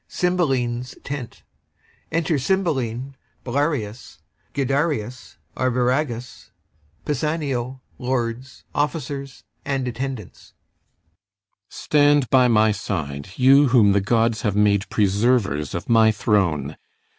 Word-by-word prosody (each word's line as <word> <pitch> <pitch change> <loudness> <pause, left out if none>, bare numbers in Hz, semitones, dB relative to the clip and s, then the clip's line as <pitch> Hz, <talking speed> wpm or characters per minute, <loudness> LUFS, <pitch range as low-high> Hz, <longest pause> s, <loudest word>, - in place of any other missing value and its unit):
CYMBELINE'S 130 -9 -1
tent 140 -4 -7 0.7
Enter 165 -2 0
CYMBELINE, 135 -6 -1 0.3
BELARIUS, 130 -4 -2 0.4
GUIDERIUS, 135 -3 -2 0.2
ARVIRAGUS, 125 0 -1 0.6
PISANIO, 140 -4 -2 0.2
LORDS, 125 0 -3
OFFICERS, 140 -2 -3 0.2
and 135 -2 -2
attendants 125 -4 -6 1.2
CYMBELINE. 145 -1 +3
Stand 125 - -10
by 130 -1 +5
my 110 -2 +4
side, 80 -9 -4
you 135 +2 +6
whom 115 -5 +5
the 100 0 +2
gods 115 +2 +1
have 105 -3 -1
made 105 -1 +2
Preservers 100 - +1
of 85 - -5
my 110 -1 +5
throne. 85 -10 0
125 Hz, 95 wpm, -22 LUFS, 110-140 Hz, 1.2 s, you